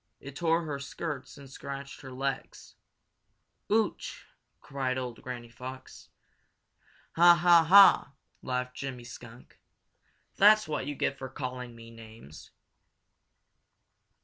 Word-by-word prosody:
It 135 0 -11
tore 165 +1 +1
her 145 -3 -5
skirts 140 0 -6
and 140 -1 -12
scratched 140 +1 -8
her 130 - -10
legs. 135 +1 -5 1.0
"Ooch!" 220 0 -1 0.3
cried 130 -2 -3
old 125 -2 -6
Granny 120 -2 -8
Fox. 130 +2 -10 1.1
"Ha! 175 +1 +8
ha! 175 -1 +5
ha!" 195 -5 +7 0.3
laughed 125 0 -3
Jimmy 135 -3 -6
Skunk. 120 0 -13 0.8
"That's 215 -1 +6
what 150 -3 -3
you 145 - -4
get 140 - -2
for 130 - -6
calling 125 -2 -6
me 115 0 -13
names." 110 -9 -13
135 Hz, 115 wpm, -29 LUFS, 125-155 Hz, 1.1 s, Ha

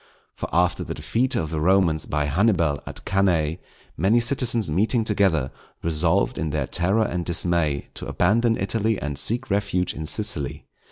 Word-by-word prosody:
For - - -6
after 90 +1 +1
the - - -6
defeat 130 +3 +1
of 80 -7 -2
the 80 - -2
Romans 85 -2 +2
by 75 0 -1
Hannibal 85 -2 +1
at - - -8
Cannæ, 90 -4 +1 0.4
many 100 +9 +2
citizens 120 -3 +1
meeting 105 +9 +1
together, 95 -10 +1 0.3
resolved, 80 0 +1
in 80 0 -2
their 75 -2 -1
terror 95 - +1
and 90 -3 -3
dismay, 85 -4 0
to - - -7
abandon 115 +5 +2
Italy 110 -1 0
and 70 0 -4
seek 115 +7 +1
refuge 100 -3 0
in 80 +1 -6
Sicily. 90 - 0
90 Hz, 160 wpm, -23 LUFS, 80-110 Hz, 0.4 s, Romans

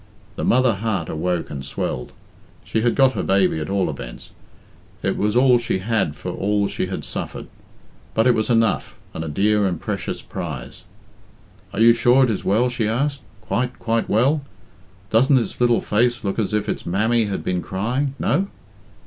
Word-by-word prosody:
The - - -4
mother 130 -1 +4
heart 100 -6 -2
awoke 85 +2 -2
and 70 -2 -5
swelled. - - -4 0.5
She 110 - -1
had 120 +1 +2
got 135 -2 +5
her - - -3
baby, 95 -4 +2
at 75 - -4
all 100 -1 +1
events. - - -7 0.7
It - - 0
was 105 +2 0
all 125 -1 +5
she 120 -4 -1
had 100 -6 0
for 90 +5 -5
all 100 +2 0
she 95 - -3
had 95 - -5
suffered; - - -5 0.7
but 110 - +3
it 125 - +5
was 110 0 0
enough, 115 -4 +1 0.2
and 80 - -4
a - - -5
dear 100 +6 +2
and 90 -4 -2
precious - - -4
prize. 70 -8 -7 0.9
"Are - - -5
you 115 +1 +7
sure 120 +3 +4
it 125 - +2
is 105 - -3
well?" 110 +6 +2
she 120 -3 -1
asked. 140 +5 -1 0.2
"Quite, 120 +5 -2
quite 115 -1 -1
well? 135 +8 +3 0.7
Doesn't 130 +5 +5
its 120 0 -2
little 120 -1 +4
face 120 +3 +1
look 100 +2 -2
as 110 - 0
if 105 -1 0
its - - -3
mammy 110 +6 +1
had 100 -2 -3
been 90 -1 -1
crying 125 +10 -2
no?" 195 +2 +1
110 Hz, 185 wpm, -22 LUFS, 95-120 Hz, 0.9 s, you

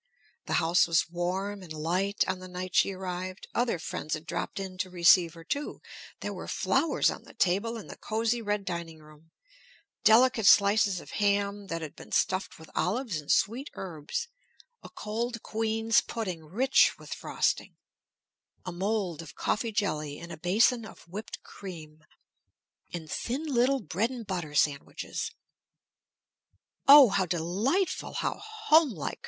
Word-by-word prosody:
The - - -2
house 170 +2 +4
was 165 -1 +2
warm 190 +4 -2
and 175 -4 -11
light 180 +6 0
on 185 - -2
the 185 - -9
night 180 0 -6
she 195 - +4
arrived; 185 0 -5
other 240 -6 +1
friends 155 -1 -3
had 155 +1 -9
dropped - - -4
in 185 -1 -6
to 185 -1 -1
receive 175 -1 +5
her, 165 - -11
too; 285 - -3 0.4
there - - -3
were - - -7
flowers 325 - +2
on - - -8
the - - -16
table 200 +6 +1
in 220 - -8
the - - -9
cosy 225 +2 -1
red 205 -2 -1
dining 170 -3 -4
room, 155 +1 -18 0.7
delicate 225 -1 +5
slices 200 -2 +5
of - - -13
ham 200 0 0
that 165 -2 -4
had 155 - -7
been - - -13
stuffed 185 +1 0
with 160 -1 -14
olives 205 - -1
and 145 - -3
sweet 245 +8 +1
herbs, 170 - -4 0.5
a - - -11
cold 230 +2 -4
queen's 225 +1 +1
pudding 185 -9 -5
rich 245 - +3
with - - -8
frosting, - - -1 0.9
a 180 - -4
mold 185 -2 -2
of 155 -4 -11
coffee 225 +1 -1
jelly 155 -9 -1
in 170 0 -9
a - - -5
basin 225 - +3
of 220 - -12
whipped 205 +6 -7
cream, 155 -5 -10 0.9
and 165 -2 -6 0.2
little 270 -1 +1
thin - - -10
bread 195 +10 0
and 245 -3 -7
butter 175 -6 -4
sandwiches. 145 -1 -1 1.6
"Oh, 280 -3 +10
how 190 -1 +1
delightful, 195 - 0
how - - -2
homelike!" 405 - +1
195 Hz, 155 wpm, -29 LUFS, 170-225 Hz, 1.6 s, Oh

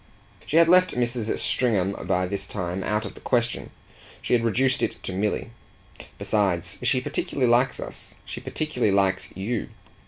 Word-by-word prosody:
She 155 - +2
had 165 0 +7
left 185 +1 +5
Mrs. 120 -2 0
Stringham 105 -7 +2 0.2
by 90 +1 +2
this 100 +2 -2
time 90 -1 -3
out 105 +2 -1
of - - -6
the - - -14
question; 120 -2 0 0.5
she - - -2
had 120 -1 +3
reduced 130 +3 +2
it - - 0
to 95 - -4
Milly. 105 +4 -1 0.7
"Besides, 95 -5 0
she 125 +1 +2
particularly 135 0 -1
likes 125 +2 +3
us. - - -7
She - - -6
particularly 125 -9 -1
likes 95 -1 +1
YOU. 105 +4 -2
115 Hz, 160 wpm, -25 LUFS, 100-125 Hz, 0.7 s, had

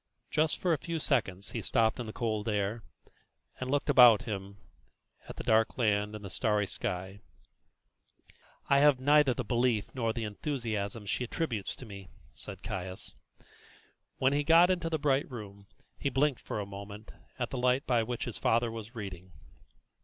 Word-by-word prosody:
Just 155 0 +2
for 180 -2 +1
a 155 - 0
few 170 +3 -3
seconds 105 - 0
he 115 - -3
stopped 110 +3 +1
in 120 - -4
the - - -5
cold 110 -1 -2
air, 105 +2 -1 0.8
and 130 - -4
looked 145 +1 0
about 125 -5 +7
him 100 -4 -6 0.7
at - - -7
the - - -6
dark 110 0 +2
land 105 -3 +1
and 105 -1 -8
the - - -6
starry 105 -3 +1
sky. 95 +1 -4 1.5
"I 140 - +5
have 145 -2 +5
now 145 +3 +5
neither 140 -5 +4
the 130 - -2
belief 120 0 0
nor 115 -4 0
the 115 0 -4
enthusiasm 110 -2 -3
she 105 - -1
attributes 120 - -3
to 130 - -10
me," 100 -3 -10 0.2
said 100 -2 -9
Caius. 95 -2 -5 1.0
When 130 +1 +2
he 145 +1 +1
got 165 +4 +6
into 175 -2 -1
the 160 - 0
bright 140 -1 +1
room 100 -5 -9 0.3
he 140 - 0
blinked 135 0 +1
for - - -4
a 105 - -3
moment 100 +2 -9 0.3
at - - -3
the 130 - -3
light 125 +2 +2
by 120 -3 +2
which 120 +1 -3
his 120 - -4
father 115 0 +2
was 115 +2 -8
reading. 95 -4 -7
115 Hz, 175 wpm, -30 LUFS, 105-135 Hz, 1.5 s, about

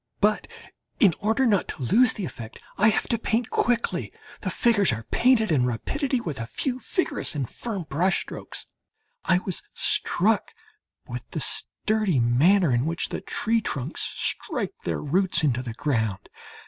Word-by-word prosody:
But, 210 +1 +2 0.5
in 195 -6 +5
order 220 +6 +1
not 205 -6 +2
to - - -7
lose 230 - +4
the 200 - -4
effect, 115 -8 -9 0.2
I 210 +2 +4
have 215 - 0
to 235 - 0
paint 230 +1 -1
quickly. 240 -1 0 0.3
The - - -3
figures 205 - +3
are 115 0 -4
painted 235 -5 +3
in 140 -5 +3
rapidly 255 - -1
with 155 - -5
a 115 - -4
few 255 - -2
vigorous 360 - -1
and 135 -4 -2
firm 205 - -5
brush 170 +5 0
strokes. - - -8 0.6
I 185 - +4
was 185 -1 -3
struck 210 +4 +1 0.5
with - - -7
the - - -4
sturdy 215 -9 +1
manner 145 +8 +4
in 120 +5 +1
which 165 +1 -1
the - - -4
tree 225 +1 0
trunks 140 - -3
strike 245 - -2
their - - -2
roots 180 +3 +3
into 125 -4 +1
the 120 -3 -6
ground. 110 -8 -2
190 Hz, 160 wpm, -25 LUFS, 135-225 Hz, 0.6 s, in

